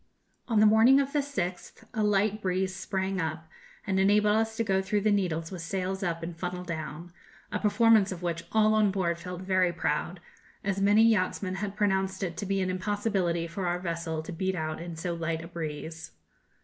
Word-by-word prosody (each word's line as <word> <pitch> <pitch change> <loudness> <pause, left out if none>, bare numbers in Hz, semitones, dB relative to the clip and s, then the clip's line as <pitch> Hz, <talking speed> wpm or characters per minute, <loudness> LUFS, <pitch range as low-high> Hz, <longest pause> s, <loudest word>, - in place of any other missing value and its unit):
On 225 -4 +2
the 215 - +6
morning 225 +5 +6
of 275 0 -1
the 295 - +2
6th 190 -11 -4
a 220 - -1
light 210 +1 +2
breeze 185 0 -1
sprang 190 0 -2
up, 160 0 -4 0.4
and 190 -2 0
enabled 210 +2 +4
us 220 0 0
to 230 - +1
go 190 -3 +1
through 205 +2 0
the 215 +1 +2
Needles 170 -5 0
with 180 -3 -6
sails 190 +3 -3
up 170 -3 -2
and 170 0 -5
funnel 180 +1 -4
down, 170 0 -6 0.4
a - - -1
performance 210 -1 +4
of 180 -1 -6
which 170 -1 -2
all 215 0 +4
on 215 -1 +4
board 175 -3 -1
felt 180 +1 -7
very 185 -1 +2
proud, 170 +1 -2 0.4
as 195 0 -1
many 205 +3 +5
yachtsmen 195 -3 +2
had 200 0 -4
pronounced 190 -2 0
it 170 -3 -3
to 200 - -4
be 195 0 0
an 185 0 0
impossibility 185 -3 -1
for 175 +2 -4
our 175 0 0
vessel 165 -2 -3
to 160 - -7
beat 190 +3 -1
out 155 -1 -3
in 170 -1 -6
so 170 +2 -3
light 165 -1 -3
a - - -8
breeze. 160 -1 -6
190 Hz, 200 wpm, -28 LUFS, 170-205 Hz, 0.4 s, the